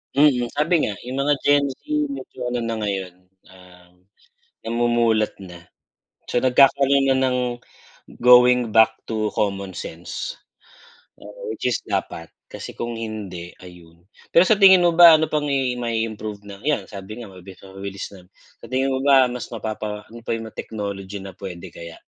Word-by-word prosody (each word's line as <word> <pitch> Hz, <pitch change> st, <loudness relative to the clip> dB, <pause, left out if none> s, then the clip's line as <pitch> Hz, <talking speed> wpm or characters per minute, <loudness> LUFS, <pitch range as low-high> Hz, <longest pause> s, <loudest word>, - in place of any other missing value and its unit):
Mm, 140 Hz, -4 st, +4 dB
sabi 155 Hz, +3 st, +2 dB
nga, 105 Hz, -, -3 dB
yung 125 Hz, +2 st, -6 dB
mga 145 Hz, -, +4 dB
Gen 145 Hz, 0 st, +3 dB
Z -, -, -35 dB, 0.3 s
medyo 275 Hz, -, -7 dB
ano 125 Hz, -1 st, -2 dB
na 115 Hz, -1 st, -3 dB
ngayon, 100 Hz, -4 st, -3 dB, 0.4 s
ah, 90 Hz, -1 st, -18 dB, 0.7 s
namumulat 115 Hz, -2 st, +1 dB
na. 85 Hz, -2 st, -12 dB, 0.6 s
So 120 Hz, -, -1 dB
nagkakaroon 135 Hz, +1 st, +4 dB
na 135 Hz, -, +3 dB
ng 125 Hz, -1 st, +1 dB, 0.8 s
going 125 Hz, 0 st, +6 dB
back 110 Hz, 0 st, +7 dB, 0.2 s
to 110 Hz, -2 st, -2 dB
common 100 Hz, -2 st, -2 dB
sense. 90 Hz, -, -6 dB, 0.9 s
Oo, -, -, -8 dB
which -, -, -2 dB
is 120 Hz, -, 0 dB
dapat 80 Hz, 0 st, -4 dB, 0.2 s
kasi -, -, -8 dB
kung 120 Hz, -1 st, -5 dB
hindi, 100 Hz, -6 st, -7 dB
ayun. 90 Hz, 0 st, -16 dB, 0.2 s
Pero 170 Hz, -, +7 dB
sa 220 Hz, -, +5 dB
tingin 190 Hz, -2 st, +7 dB
mo 175 Hz, -, +4 dB
ba 170 Hz, -2 st, +10 dB
ano 160 Hz, 0 st, +3 dB
pang 150 Hz, -1 st, -1 dB
i 135 Hz, -3 st, 0 dB
may 115 Hz, -2 st, -1 dB
ma-iimprove 105 Hz, -1 st, -7 dB
na 100 Hz, -1 st, -11 dB
yan, 145 Hz, -10 st, 0 dB
sabi 105 Hz, +4 st, -8 dB
nga 110 Hz, -, -9 dB
mabilis 95 Hz, 0 st, -13 dB
mabilis 95 Hz, 0 st, -7 dB
lang 95 Hz, -3 st, -15 dB, 0.3 s
sa -, -, -13 dB
tingin 130 Hz, +3 st, 0 dB
mo 130 Hz, -, 0 dB
ba 135 Hz, -3 st, +6 dB
mas 125 Hz, 0 st, -5 dB
mapapa 105 Hz, -2 st, -5 dB
ano 115 Hz, 0 st, -13 dB
pa -, -, -1 dB
yung 115 Hz, -1 st, -5 dB
mga -, -, -28 dB
technology 100 Hz, -2 st, -6 dB
na 95 Hz, -1 st, -10 dB
puwede 90 Hz, -3 st, -8 dB
kaya? 85 Hz, 0 st, -11 dB
115 Hz, 170 wpm, -22 LUFS, 100-130 Hz, 0.9 s, ba